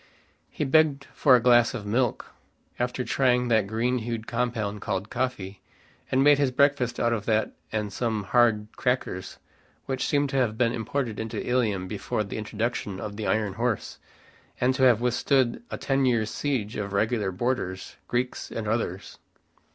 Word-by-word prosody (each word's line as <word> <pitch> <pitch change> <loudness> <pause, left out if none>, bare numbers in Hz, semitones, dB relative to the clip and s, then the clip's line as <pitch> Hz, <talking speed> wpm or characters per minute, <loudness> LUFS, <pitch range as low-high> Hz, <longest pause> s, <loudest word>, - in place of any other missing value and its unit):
He - - -3
begged 140 -1 +3
for 135 -3 +5
a - - +5
glass 120 +1 +4
of 105 -4 -6
milk, 120 +3 -1 0.5
after 125 +1 -1
trying 125 0 +2
that 110 -3 +3
green 120 +4 0
hued 115 -1 -4
compound 115 -4 -2
called 95 0 -3
coffee, 100 -7 -3 0.5
and 130 +1 +3
made 145 0 +6
his 140 -2 +3
breakfast 130 -2 +2
out 120 0 +2
of 105 -3 -3
that 110 -1 +1 0.2
and 105 -2 -2
some 110 -3 -1
hard 115 -1 +3
crackers 125 -7 -2 0.5
which 135 -1 -2
seemed 145 -1 +1
to 135 - -1
have 115 -4 +1
been 115 -1 +2
imported 120 0 -3
into 110 -1 -4
Ilium 110 -7 0
before 105 +1 -2
the 100 - -5
introduction 110 -2 -3
of 100 0 -6
the 110 0 -4
iron 105 -3 0
horse, 115 +1 -2 0.6
and 125 +1 +3
to 130 - -3
have 125 -3 +5
withstood 125 - +1
a - - -4
ten 135 -1 +1
years 110 -3 +1
siege 125 -8 -2
of 100 -1 -4
regular 105 -1 +1
boarders, 95 -3 -3
Greeks 125 +1 -2
and 110 -2 -4
others. 105 -4 -3
120 Hz, 165 wpm, -26 LUFS, 105-125 Hz, 0.6 s, made